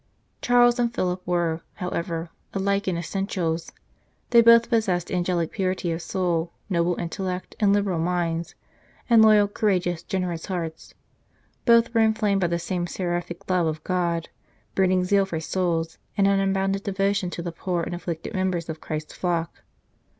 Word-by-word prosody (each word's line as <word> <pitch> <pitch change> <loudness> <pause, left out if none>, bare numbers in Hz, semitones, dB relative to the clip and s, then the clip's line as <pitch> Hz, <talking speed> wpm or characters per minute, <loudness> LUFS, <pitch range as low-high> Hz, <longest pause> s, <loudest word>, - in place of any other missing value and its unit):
Charles 245 0 +4
and 235 -1 +2
Philip 185 -5 -1
were, 170 -2 0
however, 170 -2 -3 0.2
alike 200 +1 0
in 180 -2 0
essentials; 170 -2 -2 0.6
they 235 -1 +8
both 230 0 +7
possessed 210 -8 0
angelic 175 -2 0
purity 185 -3 -1
of 165 +1 -3
soul, 175 -3 -1 0.2
noble, 170 0 +2
intellectual, 180 +2 -4
and 205 -2 +4
liberal 200 -4 +1
minds, 170 -1 -1 0.6
and 230 -1 +8
loyal, 215 -2 +6
courageous, 185 -5 0
generous 180 -3 -3
hearts. 170 -4 -5 0.7
Both 235 -1 +5
were 230 - +4
inflamed 215 -3 +2
by 175 - +3
the 170 0 0
same 175 0 -2
seraphic 175 -1 -4
love 180 -3 +2
of 155 0 -3
God, 170 -2 -1 0.4
burning 185 -1 +2
zeal 195 +1 +2
for 165 -4 -3
souls, 165 -1 -1 0.2
and 195 -1 +4
an 200 0 +3
unbounded 195 0 0
devotion 195 -1 0
to 170 - -5
the 170 - -3
poor 175 0 -2
and - - -4
afflicted 170 +1 -5
members 185 -3 -1
of 160 0 -5
Christ 155 0 -5
s - - -14
flock. 170 -2 -2
180 Hz, 155 wpm, -25 LUFS, 170-195 Hz, 0.7 s, they